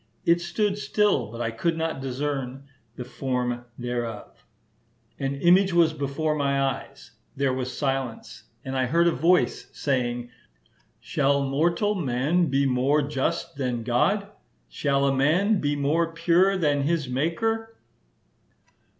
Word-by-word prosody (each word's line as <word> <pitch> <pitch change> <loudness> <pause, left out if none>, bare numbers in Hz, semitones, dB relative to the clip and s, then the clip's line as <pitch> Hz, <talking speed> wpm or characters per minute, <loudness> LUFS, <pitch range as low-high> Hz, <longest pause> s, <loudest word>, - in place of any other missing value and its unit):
It 170 +1 +3
stood 200 +4 -1
still, 205 - +1
but 115 +1 -6
I 115 -1 -1
could 160 +9 -1
not 160 -4 -2
discern 135 0 -3 0.3
the 125 - -6
form 125 -2 -3
thereof: 120 -2 -5 0.8
an 135 0 -2
image 180 +6 +4
was 165 -2 +4
before 150 +1 -1
my 140 -2 0
eyes, 135 -1 -3 0.2
there 135 -1 +1
was 130 0 -4
silence, 135 -4 -3 0.2
and 130 0 -4
I 130 -1 +1
heard 170 +6 +3
a 170 - +4
voice, 180 +3 +1
saying, 120 -3 -2 0.7
Shall 140 +1 +1
mortal 170 +9 +1
man 160 +1 +1
be 140 0 +1
more 135 +3 +2
just 140 -1 -2
than 125 -4 -2
God? 195 - +1 0.4
Shall 140 -1 0
a 135 - +2
man 180 +10 +3
be 145 0 0
more 160 +4 +1
pure 175 +4 +3
than 145 -5 +1
his 150 0 0
Maker?" 225 - -1
140 Hz, 135 wpm, -25 LUFS, 130-170 Hz, 0.8 s, image